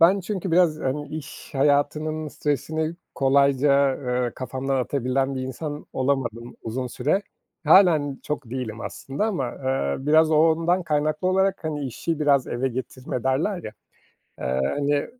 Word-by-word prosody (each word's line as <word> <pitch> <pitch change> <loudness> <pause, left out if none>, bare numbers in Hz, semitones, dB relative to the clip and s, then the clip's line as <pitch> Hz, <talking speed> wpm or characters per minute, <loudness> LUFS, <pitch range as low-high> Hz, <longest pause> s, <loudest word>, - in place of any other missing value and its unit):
ben 185 +4 +6
çünkü 190 -1 -3
biraz, 165 -2 +3
hani, 145 +2 -2
iş 155 -2 -8
hayatının 150 +2 +1
stresini 155 +3 -2 0.2
kolayca, 140 0 +3
eee, 125 -2 -1
kafamdan 130 +1 -2
atabilen 135 +1 0
bir 130 - -3
insan 145 +3 -5
olamadım 125 -3 -2
uzun 125 +3 -3
süre. 145 +11 0 0.4
Hâlen 155 -5 +5
çok 145 -5 -4
değilim 120 -4 -4
aslında 140 +11 -3
ama, 140 - -1
eee, 130 - -2
biraz 155 +1 +5
o 155 - +4
ondan 165 +3 +3
kaynaklı 155 +2 0
olarak, 190 -1 +1
hani, 150 -2 -2
"İşi 160 +5 -3
biraz 140 -3 +3
eve 130 +2 -1
getirme." 130 0 -5
derler 160 +8 0
ya, 110 - -6 0.7
eee, 65 +1 -1
hani, 145 0 0
145 Hz, 140 wpm, -24 LUFS, 130-155 Hz, 0.7 s, ben